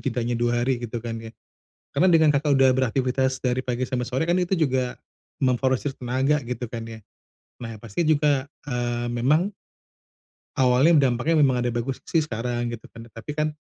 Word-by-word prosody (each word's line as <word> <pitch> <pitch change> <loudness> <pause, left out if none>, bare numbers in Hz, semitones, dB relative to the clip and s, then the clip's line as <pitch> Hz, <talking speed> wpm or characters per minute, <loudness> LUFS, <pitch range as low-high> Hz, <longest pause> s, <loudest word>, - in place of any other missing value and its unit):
jedanya 120 -1 -1
2 120 0 +1
hari 125 -2 0
gitu 120 0 -5
kan 115 -1 -4
ya. 115 - -8 0.7
Karena 185 - +3
dengan 160 -2 +5
Kakak, 145 +1 +2
udah 135 0 +5
beraktifitas 130 +1 0
dari 125 0 0
pagi 125 0 -2
sampai 125 -1 -2
sore 130 +4 -1
kan, 175 - +3
itu 180 +1 0
juga 130 -6 0 0.5
memforsir 130 +1 +1
tenaga, 130 +4 +1
gitu 125 -1 -4
kan 115 -1 -6
ya. 115 -1 -9 0.6
Nah, 115 -1 -6
ya - - -10
pasti 115 - -2
juga 145 -3 +2 0.2
eee, 120 -1 -2
memang 150 - +2 1.1
awalnya 135 +3 +5
dampaknya, 155 +8 0
memang 130 -2 +2
ada 120 - +1
bagus 120 +3 -3
sih 165 - +2
sekarang, 120 -1 -3
gitu 115 -2 -8
kan. 115 0 -10
Tapi 115 +6 -7
kan 155 0 +1
125 Hz, 175 wpm, -24 LUFS, 120-140 Hz, 1.1 s, dengan